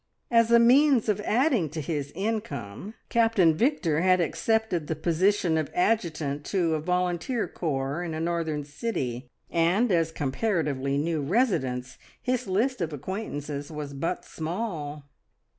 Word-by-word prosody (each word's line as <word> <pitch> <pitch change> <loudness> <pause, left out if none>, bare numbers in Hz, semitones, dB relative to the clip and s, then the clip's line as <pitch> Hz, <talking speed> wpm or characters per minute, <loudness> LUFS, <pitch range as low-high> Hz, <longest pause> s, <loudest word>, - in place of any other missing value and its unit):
As 230 -1 +5
a 235 - +7
means 255 +1 +5
of 210 0 +1
adding 235 - +2
to 155 +2 -5
his 145 -2 -3
income 210 - -4
Captain 225 -8 +4
Victor 175 - +1
had 185 0 +4
accepted 175 +1 0
the 160 - -1
position 170 +1 +2
of 155 - -2
adjutant 165 -8 0
to 175 -5 +1
a 155 - 0
volunteer 180 +7 -1
corps 140 -1 -2
in 170 -3 -4
a - - -3
northern 165 -3 -1
city, 135 - -4 0.2
and, 180 +8 +2
as 165 -2 +2
comparatively 145 -3 -1
new 160 +1 0
residents, 135 - 0 0.2
his 250 -4 -1
list 220 +5 0
of 165 -2 -1
acquaintances 145 -3 -5
was 150 -2 -6
but 165 +6 -3
small. 160 -4 -4
170 Hz, 140 wpm, -27 LUFS, 150-215 Hz, 0.2 s, a